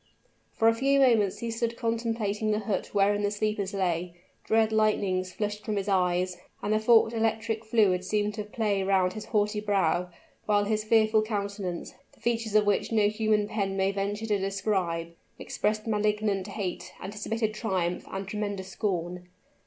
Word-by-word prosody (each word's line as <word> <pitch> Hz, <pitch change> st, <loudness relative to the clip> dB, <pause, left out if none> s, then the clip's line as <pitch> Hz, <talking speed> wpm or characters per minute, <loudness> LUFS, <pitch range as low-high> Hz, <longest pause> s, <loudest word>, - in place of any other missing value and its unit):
For 225 Hz, -, +2 dB
a 230 Hz, -, +6 dB
few 275 Hz, +4 st, +2 dB
moments 225 Hz, -7 st, +4 dB
he 230 Hz, -1 st, -4 dB
stood 230 Hz, 0 st, -2 dB
contemplating 225 Hz, -2 st, -1 dB
the 215 Hz, 0 st, +1 dB
hut 200 Hz, -2 st, -2 dB
wherein 205 Hz, 0 st, +2 dB
the 205 Hz, -, +1 dB
sleepers 205 Hz, -1 st, -1 dB
lay; 180 Hz, -3 st, -1 dB, 0.3 s
dread 220 Hz, 0 st, +2 dB
lightnings 200 Hz, -4 st, +1 dB
flushed 210 Hz, +1 st, -3 dB
from 215 Hz, -, -2 dB
his 200 Hz, 0 st, -2 dB
eyes, 180 Hz, -2 st, +1 dB, 0.3 s
and 210 Hz, -, +1 dB
the 215 Hz, -, +3 dB
forked 225 Hz, 0 st, +5 dB
electric 225 Hz, 0 st, -1 dB
fluid 210 Hz, -5 st, +2 dB
seemed 210 Hz, +2 st, 0 dB
to 210 Hz, -, -4 dB
play 210 Hz, -2 st, -1 dB
round 190 Hz, -1 st, +2 dB
his 215 Hz, -, -7 dB
haughty 210 Hz, -1 st, 0 dB
brow, 190 Hz, -4 st, +1 dB, 0.4 s
while 205 Hz, -1 st, +3 dB
his 215 Hz, +1 st, 0 dB
fearful 220 Hz, 0 st, +4 dB
countenance, 200 Hz, -4 st, -4 dB, 0.2 s
the -, -, -24 dB
features 230 Hz, -2 st, -1 dB
of 210 Hz, -1 st, +5 dB
which 205 Hz, +2 st, +1 dB
no 210 Hz, -2 st, +4 dB
human 215 Hz, -1 st, +1 dB
pen 200 Hz, -3 st, -2 dB
may 190 Hz, 0 st, +2 dB
venture 200 Hz, +2 st, -2 dB
to 210 Hz, -2 st, +1 dB
describe, 190 Hz, -4 st, -1 dB, 0.2 s
expressed 215 Hz, 0 st, -2 dB
malignant 210 Hz, -2 st, 0 dB
hate, 195 Hz, -3 st, -5 dB
anticipated 215 Hz, +2 st, -3 dB
triumph, 185 Hz, -5 st, -2 dB
and 195 Hz, 0 st, -5 dB
tremendous 205 Hz, -2 st, -4 dB
scorn. 180 Hz, -2 st, -3 dB
210 Hz, 165 wpm, -28 LUFS, 195-220 Hz, 0.4 s, a